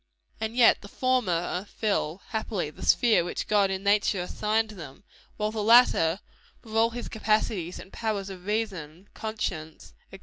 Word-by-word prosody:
And 220 +1 -3
yet 245 -2 +5
the 205 - -10
former 195 -8 0
fill, 200 -5 -2
happily, 215 -8 -3
the - - -12
sphere 230 -7 +4
which 175 - -4
God 205 -2 +3
in 190 0 -3
nature 205 -1 +2
assigned 215 +4 -1
them; 160 -6 -11 0.3
while 210 0 -1
the 220 -1 -3
latter, 210 -6 +5 0.4
with 220 -1 -9
all 225 +1 +4
his 240 +1 -6
capacities 215 -5 -1
and 190 - -12
powers 205 -4 -3
of 185 0 -11
reason, 195 -5 -3
conscience, 190 -8 -5 0.2
&c. 195 - -9
210 Hz, 160 wpm, -27 LUFS, 180-220 Hz, 0.4 s, yet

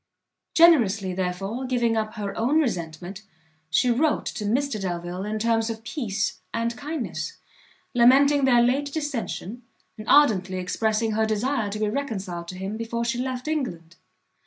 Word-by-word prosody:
Generously, 220 - +5
therefore, 190 +6 -3
giving 240 -3 +1
up 215 0 -2
her 200 -2 -4
own 265 +8 +2
resentment, 180 - -3 0.5
she 240 +9 +3
wrote 290 +6 +1
to 210 - -4
Mr 250 +1 0
Delvile 175 0 -4
in 215 +1 -2
terms 225 0 +1
of 225 0 -5
peace 220 -8 -2
and 230 +1 -1
kindness, 295 -2 -4 0.6
lamenting 270 +3 +5
their 240 -2 +5
late 275 +4 +1
dissention, 250 - -4 0.4
and 215 - -7
ardently 195 -10 +4
expressing 220 +4 0
her 220 +1 +1
desire 220 +1 0
to 205 - -4
be 215 0 0
reconciled 195 -9 -4
to 185 - -7
him 195 +3 -4
before 235 +1 -3
she 240 +1 -1
left 255 +1 -3
England. 175 - -3
225 Hz, 150 wpm, -25 LUFS, 195-255 Hz, 0.6 s, Generously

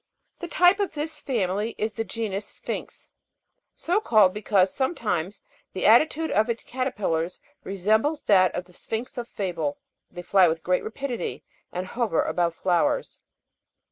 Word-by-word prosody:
The 350 - -5
type 360 +3 +4
of 400 -5 -1
this 305 +1 -3
family 210 -3 -1
is 215 0 -1
the 225 - -2
genus 210 -3 -4
Sphinx, - - -7 0.6
so 360 +5 +1
called, 210 - +5
because 200 -3 +2
sometimes 210 - -2 0.3
the 185 - -2
attitude 310 +8 +4
of 215 +3 +2
its 230 0 -2
caterpillar 210 -11 -1 0.4
resembles 215 - +1
that 185 -3 +5
of 180 - -3
the 180 - -20
sphinx 230 +7 -5
of 235 - -5
fable; 170 -10 -3 0.3
they 175 - -9
fly 185 0 +5
with 160 0 -2
great 180 0 +1
rapidity 250 +2 -4 0.3
and 180 +1 -3
hover 220 -3 0
above 170 -2 0
flowers. 175 -1 0
210 Hz, 145 wpm, -25 LUFS, 185-250 Hz, 0.6 s, called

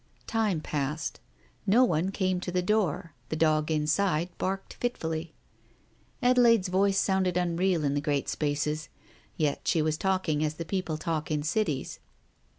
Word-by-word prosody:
Time 215 -8 0
passed. 150 +1 -3 0.5
No 230 +6 +6
one 175 -5 +1
came 185 -2 0
to 180 - -4
the 180 0 0
door, 180 -5 0 0.2
the - - -1
dog 155 -1 +2
inside 160 +2 +1
barked 195 +1 -2
fitfully. 165 -9 -3 0.9
Adelaide's 235 -6 +5
voice 195 +1 +2
sounded 190 -2 +2
unreal 175 -1 +1
in 140 -1 +1
the 145 - 0
great 145 -2 0
spaces.... 150 0 -1 0.5
Yet 150 -3 0
she 165 -3 +3
was 155 0 0
talking 185 -6 +1
as 155 0 -1
people 165 0 -3
talk 155 -1 -2
in 150 -2 0
cities. 155 -4 -1
165 Hz, 145 wpm, -28 LUFS, 155-190 Hz, 0.9 s, No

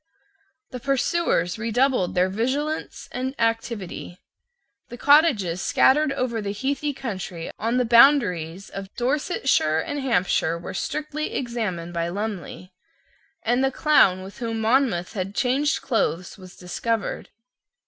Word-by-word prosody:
The 250 - -6
pursuers 270 - 0
redoubled 230 -3 +1
their 180 +1 +3
vigilance 265 +10 -2
and 260 +2 -3
activity. 225 -6 -2 0.7
The 240 - -8
cottages 245 - +4
scattered 300 +2 +3
over 235 -4 -2
the 200 -1 -3
heathy 280 +6 -2
country 190 -10 -6
on 230 +3 0
the 250 - +2
boundaries 205 - +4
of 195 0 -7
Dorsetshire 265 - +1
and 290 - -3
Hampshire 185 -9 +1
were 170 +2 -7
strictly 305 +8 -3
examined 210 -9 -3
by 170 0 -1
Lumley; 195 -1 -5 0.7
and 245 +3 +2
the 270 - +3
clown 230 - +3
with 195 +6 -11
whom 225 -2 -3
Monmouth 220 -7 +1
had 195 -1 -4
changed 275 +4 +1
clothes 185 - -1
was 185 -2 -13
discovered. 205 +4 -3
230 Hz, 125 wpm, -24 LUFS, 185-270 Hz, 0.7 s, cottages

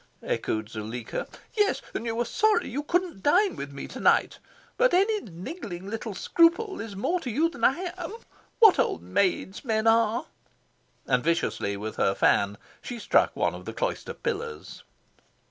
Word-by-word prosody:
echoed 110 -1 -2
Zuleika. 110 +1 -5 0.3
"Yes, 415 -2 +2
and 235 - -3
you 225 - -1
were 240 +1 0
'sorry' 430 - +2
you 275 +5 -3
couldn't 350 - -1
dine 365 - +3
with 140 0 -6
me 140 - -7
to - - -8
night. - - +3 0.4
But - - +3
any 420 +3 +3
little 190 - -13
niggling 205 - -6
scruple 350 - +3
is 225 -3 -7
more 335 - 0
to 260 - -5
you 305 +9 +2
than 345 - -10
I 350 +6 +2
am. 350 +3 -5 0.4
What 440 -5 +7
old 85 - 0
maids 185 - 0
men 220 -3 0
are!" 225 0 +3 0.8
And 125 -2 +1
viciously 165 -11 0
with 110 +2 -6
her 95 - +2
fan 100 0 +2 0.2
she 245 - -6
struck 225 - +2
one - - +1
of - - -9
the - - -5
cloister - - -3
pillars. 460 -1 -5
230 Hz, 165 wpm, -27 LUFS, -, 0.8 s, What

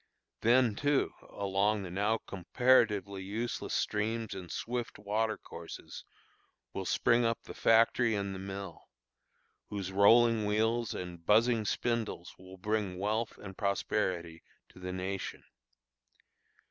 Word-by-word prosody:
Then, 120 0 +4
too, 145 +5 +1 0.2
along 100 +1 0
the 90 - -7
now 105 +4 +1
comparatively 100 -1 +2
useless 110 +5 -3
streams 110 +1 -1
and 90 -3 -7
swift 120 0 -4
water 110 +2 -1
courses, - - -9 0.7
will 95 - -4
spring 120 +6 +3
up 115 0 0
the - - -9
factory 115 0 +4
and 100 -1 -2
the 95 - -6
mill, 95 0 -7 0.9
whose 100 -2 -4
rolling 110 +2 +5
wheels 110 +2 +1
and 90 -2 -7
buzzing 110 +3 +3
spindles 115 -6 -2
will 95 +1 -12
bring 105 -1 -1
wealth 110 +4 -1
and 95 -2 -9
prosperity 90 -4 -1 0.3
to - - -16
the 90 0 -5
nation. 95 +1 -4
105 Hz, 120 wpm, -32 LUFS, 95-115 Hz, 0.9 s, rolling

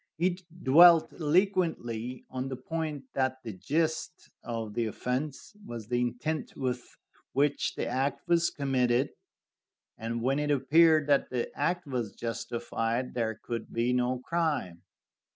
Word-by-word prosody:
He 175 +2 +1 0.2
dwelt 165 +4 +7
eloquently 155 - 0
on 130 0 -3
the 135 - -4
point 150 +1 -4
that 130 -1 -1
the 110 - -5
gist 160 - -2
of 115 -3 -4
the 115 0 0
offense 130 - -4
was 115 - -7
the 120 0 +1
intent 125 +6 -2
with 125 -2 -3 0.4
which 145 +2 +1
the - - -2
act 140 +4 -1
was 170 -1 +3
committed, 130 -2 +1 0.9
and 115 +1 -3
when 135 +3 +2
it 150 0 -1
appeared 155 +3 +5
that 140 -1 +2
the 125 -2 -3
act 175 +5 0
was 125 -7 -3
justified, 120 +1 -2
there 115 -2 -1
could 115 -2 -5
be 120 +2 +1
no 125 0 +1
crime. 145 - -1
130 Hz, 135 wpm, -29 LUFS, 120-155 Hz, 0.9 s, dwelt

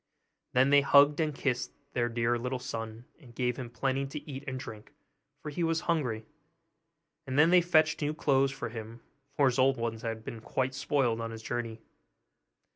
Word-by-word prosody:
Then 130 +2 +4
they 145 0 +7
hugged 145 +2 +6
and 155 -3 0
kissed 130 -3 -1 0.2
their 120 -1 +1
dear 120 0 +1
little 125 +2 -2
son, 115 -2 -6
and 120 -7 -16
gave 125 -1 0
him 125 -2 -6
plenty 135 +2 -1
to 145 +2 -8
eat 135 -1 -6
and 130 -1 -3
drink, 110 -4 -9 0.5
for 150 - -5
he 170 +4 -2
was 165 -1 +1
very - - -13
hungry; 125 -10 0 1.0
and 130 +1 -2
then 160 +3 +6
they 180 0 +7
fetched 160 -3 +3
new 150 +1 -1
clothes 135 -2 +3
for 125 - -5
him, 115 +1 -8 0.4
for 145 - +5
his 130 -1 +2
old 130 0 +4
ones 115 -1 -3
had 115 -1 -4
been 115 - -6
quite 130 +3 -1
spoiled 130 -4 0
on 115 - -3
his 115 0 -8
journey. 115 -2 -4
130 Hz, 195 wpm, -30 LUFS, 115-145 Hz, 1.0 s, they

